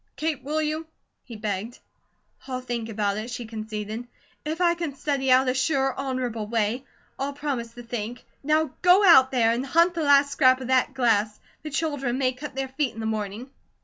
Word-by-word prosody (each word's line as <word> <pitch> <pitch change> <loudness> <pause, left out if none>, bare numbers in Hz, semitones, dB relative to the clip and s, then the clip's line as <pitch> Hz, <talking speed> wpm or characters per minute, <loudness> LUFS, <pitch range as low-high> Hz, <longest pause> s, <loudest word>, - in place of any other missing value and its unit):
Kate, 310 -3 -2
will 305 +3 -1
you?" 310 +1 -3 0.4
he 235 - -10
begged. 210 +2 -4 0.7
"I'll 255 -1 -3
think 240 -3 -4
about 205 -2 -1
it," 220 +3 -5
she 245 -1 -5
conceded. 220 +1 -6 0.4
"If 315 +2 -3
I 345 -1 +4
can 335 -5 -4
study 270 -2 0
out 260 +1 +5
a 255 - +2
sure, 265 0 +1
honourable 255 -5 -3
way. 230 +3 -1 0.3
I'll 280 +1 -2
promise 265 -5 -4
to 240 - -9
think. 235 0 -5 0.2
Now 305 0 +2
go 365 +3 +6
out 265 -7 +8
there, 235 -4 +3
and 235 +2 -1
hunt 335 +6 +3
the 335 - -2
last 285 -1 +5
scrap 260 -3 +4
of 260 -1 -6
that 260 +1 +2
glass; 220 -4 +1 0.2
the 310 - -6
children 285 -5 -1
may 260 -1 +2
cut 275 +2 -8
their 270 0 -3
feet 270 0 -2
in - - -8
the 220 - -3
morning." 220 +3 -4
260 Hz, 195 wpm, -25 LUFS, 230-285 Hz, 0.7 s, out